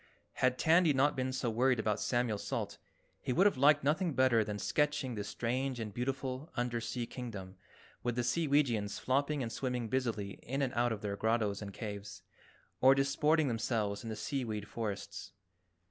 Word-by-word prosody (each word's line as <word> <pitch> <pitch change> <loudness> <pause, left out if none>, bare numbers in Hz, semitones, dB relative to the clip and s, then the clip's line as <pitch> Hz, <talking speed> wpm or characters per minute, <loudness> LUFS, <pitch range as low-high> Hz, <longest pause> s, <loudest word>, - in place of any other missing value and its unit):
Had 130 0 +1
Tandy 165 +2 +5
not 140 +2 +3
been 130 0 -1
so 130 -2 -1
worried 125 +2 +2
about 105 -1 0
Samuel 120 -4 0
Salt - - -4 0.4
he - - -2
would 185 +10 +4
have 205 - +5
liked 145 +2 +5
nothing 160 +4 +1
better 130 -4 +4
than 105 -1 -4
sketching 150 +2 0
this 105 -2 -4
strange 130 +2 -2
and 110 -3 -4
beautiful 130 - -3
under 120 -1 -1
sea 120 +1 -3
Kingdom 105 -7 -7 0.5
with 120 -1 -1
the 120 - 0
Seeweegians 135 -7 +1
flopping 140 +2 +1
and 115 - -4
swimming 125 -2 -2
busily 115 -6 -2
in 135 +3 -2
and 130 -1 -1
out 120 0 +2
of 110 -2 -3
their 100 -1 -2
grottos 110 -2 0
and 100 -1 -6
caves, 100 -2 -7 0.6
or 130 +1 +7
disporting 145 +3 +2
themselves 110 -3 -1
in 115 - -5
the 110 - -3
sea 135 +3 -2
weed 105 -3 -4
forests. 100 -3 -5
120 Hz, 175 wpm, -33 LUFS, 110-135 Hz, 0.6 s, or